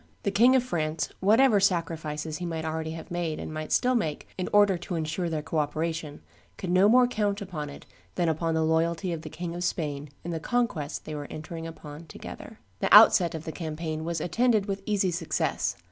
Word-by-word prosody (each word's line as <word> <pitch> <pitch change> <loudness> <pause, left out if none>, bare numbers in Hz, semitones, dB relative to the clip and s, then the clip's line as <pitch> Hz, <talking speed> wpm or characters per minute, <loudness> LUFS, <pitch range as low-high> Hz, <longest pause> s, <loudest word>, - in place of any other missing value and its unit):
The 200 - 0
King 240 +6 +5
of 255 - +3
France, 160 -9 -2
whatever 220 +3 +5
sacrifices 160 -4 -1
he 180 - -4
might 160 -1 -3
already 160 0 -3
have 165 +1 -9
made 170 -3 -2
and - - -6
might 155 0 -5
still 250 +1 +3
make 160 -12 -1
in 185 - -3
order 205 -2 +5
to 175 +1 -5
insure 165 +2 -2
their 155 -2 -2
co 160 - -1
operation, 155 0 -3 0.4
could 180 - -4
no 185 +3 +5
more 250 +2 +6
count 210 -4 -1
upon 170 -8 -5
it 145 - -11 0.3
than 175 -2 +1
upon 165 +1 0
the 160 - +2
loyalty 165 +3 +1
of 160 - -5
the 155 - -8
King 170 +2 -5
of 175 +1 -4
Spain 150 -4 -2
in 175 - -4
the 165 - -2
conquest 200 - -1
they 155 - -6
were 145 -1 -5
entering 165 +1 -7
upon 160 0 -10
together. - - -10 0.2
The - - -1
outset 170 -3 +8
of 160 - -6
the 165 - -5
campaign 155 -1 -4
was 165 0 -2
attended 220 +4 +2
with 195 -1 -3
easy 200 -3 +1
success. 170 -1 -1
165 Hz, 205 wpm, -27 LUFS, 155-195 Hz, 0.4 s, outset